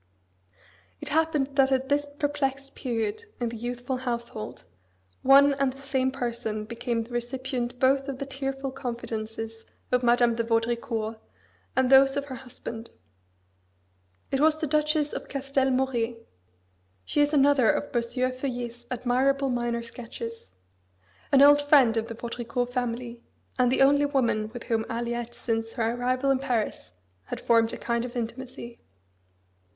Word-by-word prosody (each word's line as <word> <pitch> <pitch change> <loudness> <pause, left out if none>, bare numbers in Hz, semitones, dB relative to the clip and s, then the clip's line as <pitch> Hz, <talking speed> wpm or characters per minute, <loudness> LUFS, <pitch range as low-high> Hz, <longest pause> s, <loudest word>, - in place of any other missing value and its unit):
It - - -4
happened 310 -3 +1
that 270 0 +5
at 265 0 +1
this 290 +1 +1
perplexed 275 -2 -1
period 230 - -3
in 240 -1 -1
the 230 - -7
youthful 245 +3 -3
household, 235 -3 -5 0.6
one 280 +1 +7
and 275 -1 +1
the 265 - -14
same 265 -1 0
person 235 -4 -3
became 235 +1 -2
the 230 - -15
recipient 245 0 -3
both 270 +2 +3
of 275 -2 -4
the 275 - -4
tearful 270 0 -4
confidences 225 -3 -5 0.3
of 250 -1 +3
Madame 240 -1 +4
de 230 0 -1
Vaudricourt 225 -1 -1 0.6
and 260 -1 +3
those 270 +1 +7
of 280 - -1
her 275 - -7
husband. 230 -2 -8 1.4
It 270 - +1
was 310 0 +4
the 315 - 0
Duchess 300 0 +1
of - - -6
Castel 275 -1 0
Moret 240 -3 -1 0.8
[she 295 - +1
is 290 0 +3
another 280 -5 +5
of 285 - -1
M. 240 - +4
Feuillet's 245 -1 -3
admirable 260 +3 +1
minor 240 -1 -1
sketches] 230 - -8 0.8
an 275 0 +7
old 290 0 +8
friend 280 -6 +5
of 225 0 -1
the 230 - -6
Vaudricourt 240 +1 -3
family, 240 -1 -3 0.4
and 250 -1 +4
the 265 - +4
only 285 +1 +4
woman 235 -6 +1
with 240 0 -7
whom 225 -2 0
Aliette 235 0 -3
since 225 -1 -2
her 230 0 0
arrival 255 +3 +1
in 265 - +2
Paris 245 - -2 0.3
had - - -5
formed 230 -1 +3
a - - -5
kind 235 0 -1
of 245 0 -6
intimacy. 240 0 -6
245 Hz, 150 wpm, -27 LUFS, 235-270 Hz, 1.4 s, old